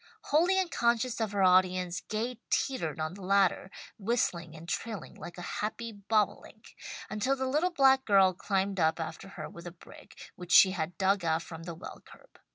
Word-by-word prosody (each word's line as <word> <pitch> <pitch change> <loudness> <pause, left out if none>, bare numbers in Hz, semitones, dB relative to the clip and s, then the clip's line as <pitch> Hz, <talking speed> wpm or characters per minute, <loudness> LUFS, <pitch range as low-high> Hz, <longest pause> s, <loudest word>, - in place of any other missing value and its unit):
Wholly 345 +6 +3
unconscious 240 -9 0
of 220 -2 -1
her 200 -1 +1
audience, 185 -1 +3
Gay 230 +3 -4
teetered 165 - -1
on 155 +2 -2
the 195 - -11
ladder, 190 0 +2 0.3
whistling 180 -7 -1
and 160 +1 -11
trilling 220 +3 -4
like 175 - -10
a 175 - -7 0.2
happy 230 +2 -4
bobolink, 210 0 -2 0.4
until 215 +6 0
the 265 -1 -3
little 300 +7 +1
black 270 -5 +4
girl 195 -3 +5
climbed 195 +1 -1
up 160 0 +2
after 160 +3 -6
her 155 -2 -5
with 170 +1 -11
a - - -6
brick 170 - -15
which 180 -1 -9
she 190 +2 +8
had 170 -2 -4
dug 195 0 +2
out 165 0 0
from 165 0 -9
the 170 -2 -6
well 170 - -10
curb. - - -19
195 Hz, 180 wpm, -30 LUFS, 175-230 Hz, 0.4 s, she